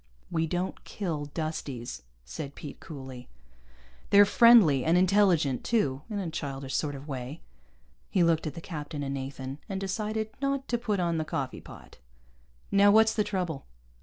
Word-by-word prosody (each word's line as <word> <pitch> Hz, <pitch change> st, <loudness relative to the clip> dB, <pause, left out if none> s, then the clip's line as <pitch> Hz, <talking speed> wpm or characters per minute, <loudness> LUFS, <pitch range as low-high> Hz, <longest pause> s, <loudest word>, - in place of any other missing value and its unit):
"We 165 Hz, -1 st, 0 dB
don't 180 Hz, +3 st, -3 dB
kill 165 Hz, -8 st, -4 dB
Dusties," 140 Hz, -, -5 dB, 0.2 s
said 135 Hz, -, -7 dB
Pete 145 Hz, -, -9 dB
coolly. 130 Hz, -4 st, -9 dB, 0.8 s
"They're 205 Hz, 0 st, +8 dB
friendly, 205 Hz, -, +6 dB
and 165 Hz, +2 st, +3 dB
intelligent 180 Hz, -8 st, +3 dB
too, 145 Hz, -, +1 dB
in 210 Hz, -, -3 dB
a 185 Hz, -5 st, -3 dB
childish 135 Hz, -3 st, -5 dB
sort 145 Hz, -2 st, -1 dB
of 140 Hz, +2 st, -10 dB
way." 130 Hz, +2 st, -6 dB, 0.7 s
He 185 Hz, -, +3 dB
looked 165 Hz, -1 st, +2 dB
at 155 Hz, -, -5 dB
the 165 Hz, -, -7 dB
captain 150 Hz, -3 st, -5 dB
and 140 Hz, 0 st, -3 dB
Nathan, 135 Hz, 0 st, -5 dB
and 195 Hz, -1 st, -2 dB
decided 215 Hz, +3 st, -2 dB
not 275 Hz, -1 st, -1 dB
to 240 Hz, -, 0 dB
put 215 Hz, -5 st, -1 dB
on 170 Hz, -2 st, 0 dB
the -, -, 0 dB
coffee 135 Hz, -4 st, -4 dB
pot. -, -, -14 dB, 0.7 s
"Now 200 Hz, +1 st, +6 dB
what's 220 Hz, +1 st, +6 dB
the 215 Hz, -, +1 dB
trouble?" 180 Hz, -8 st, -3 dB
165 Hz, 165 wpm, -28 LUFS, 140-200 Hz, 0.8 s, They're